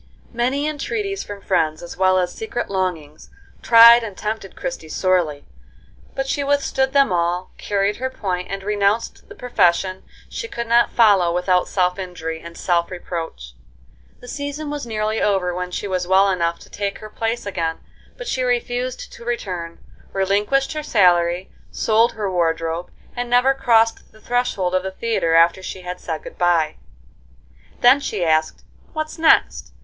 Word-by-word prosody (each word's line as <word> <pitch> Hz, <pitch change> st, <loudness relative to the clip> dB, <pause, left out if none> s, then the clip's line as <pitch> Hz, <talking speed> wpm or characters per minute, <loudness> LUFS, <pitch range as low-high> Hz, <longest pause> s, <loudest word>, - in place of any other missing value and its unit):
Many 255 Hz, +5 st, 0 dB
entreaties 395 Hz, +7 st, -3 dB
from 205 Hz, -1 st, -9 dB
friends, 155 Hz, -5 st, 0 dB
as 175 Hz, -, -8 dB
well 185 Hz, 0 st, +3 dB
as 180 Hz, -1 st, 0 dB
secret 440 Hz, -, -4 dB
longings, 170 Hz, -6 st, -3 dB, 0.3 s
tried 235 Hz, 0 st, +8 dB
and 210 Hz, -4 st, -7 dB
tempted 215 Hz, -2 st, -4 dB
Christie 260 Hz, -12 st, -6 dB
sorely, 170 Hz, -6 st, 0 dB, 0.7 s
but 270 Hz, -, -1 dB
she 280 Hz, +1 st, -1 dB
withstood 275 Hz, -1 st, +1 dB
them 275 Hz, -6 st, +3 dB
all, 175 Hz, +1 st, -1 dB
carried 200 Hz, 0 st, 0 dB
her 260 Hz, +1 st, -2 dB
point, 185 Hz, -7 st, -3 dB
and 195 Hz, 0 st, -5 dB
renounced 205 Hz, +2 st, -1 dB
the -, -, -11 dB
profession 185 Hz, -5 st, +1 dB, 0.3 s
she 460 Hz, -, -6 dB
could 235 Hz, -, -4 dB
not 235 Hz, +1 st, +4 dB
follow 200 Hz, -7 st, +4 dB
without 180 Hz, +1 st, +1 dB
self 180 Hz, 0 st, 0 dB
injury 165 Hz, -3 st, -5 dB
and 170 Hz, 0 st, -11 dB
self 170 Hz, -1 st, 0 dB
reproach. 165 Hz, -, -6 dB, 0.7 s
The 245 Hz, -, -12 dB
season 285 Hz, +3 st, -5 dB
was 290 Hz, -4 st, -5 dB
nearly 215 Hz, 0 st, -1 dB
over 190 Hz, -3 st, +1 dB
when 180 Hz, 0 st, -4 dB
she 180 Hz, -, -4 dB
was 185 Hz, -2 st, -2 dB
well 195 Hz, +1 st, +4 dB
enough 170 Hz, -2 st, 0 dB
to -, -, -15 dB
take 200 Hz, -1 st, -3 dB
her 215 Hz, -, -10 dB
place 225 Hz, +1 st, -2 dB
again, 165 Hz, -5 st, -2 dB, 0.4 s
but -, -, -7 dB
she 260 Hz, -, -1 dB
refused 245 Hz, 0 st, -2 dB
to -, -, -12 dB
return, 180 Hz, -8 st, -4 dB, 0.4 s
relinquished 205 Hz, +9 st, +1 dB
her 305 Hz, -, -3 dB
salary, 180 Hz, -, +2 dB, 0.2 s
sold 225 Hz, +2 st, +2 dB
her 210 Hz, -2 st, -3 dB
wardrobe, 165 Hz, -1 st, -1 dB, 0.3 s
and 245 Hz, 0 st, -3 dB
never 250 Hz, +2 st, +4 dB
crossed 230 Hz, -4 st, +2 dB
the 215 Hz, -, -19 dB
threshold 240 Hz, -6 st, -1 dB
of 185 Hz, -, +2 dB
the 190 Hz, -, -4 dB
theatre 190 Hz, -5 st, 0 dB
after 170 Hz, +3 st, +4 dB
she 185 Hz, 0 st, -7 dB
had 180 Hz, 0 st, -6 dB
said 160 Hz, -3 st, -5 dB
good -, -, -11 dB
bye. 170 Hz, -3 st, +2 dB, 1.0 s
Then 250 Hz, +3 st, +6 dB
she 210 Hz, -10 st, -2 dB
asked, 155 Hz, -1 st, +1 dB, 0.3 s
"What 310 Hz, -1 st, -4 dB
next?" 320 Hz, 0 st, +3 dB
195 Hz, 165 wpm, -21 LUFS, 180-240 Hz, 1.0 s, tried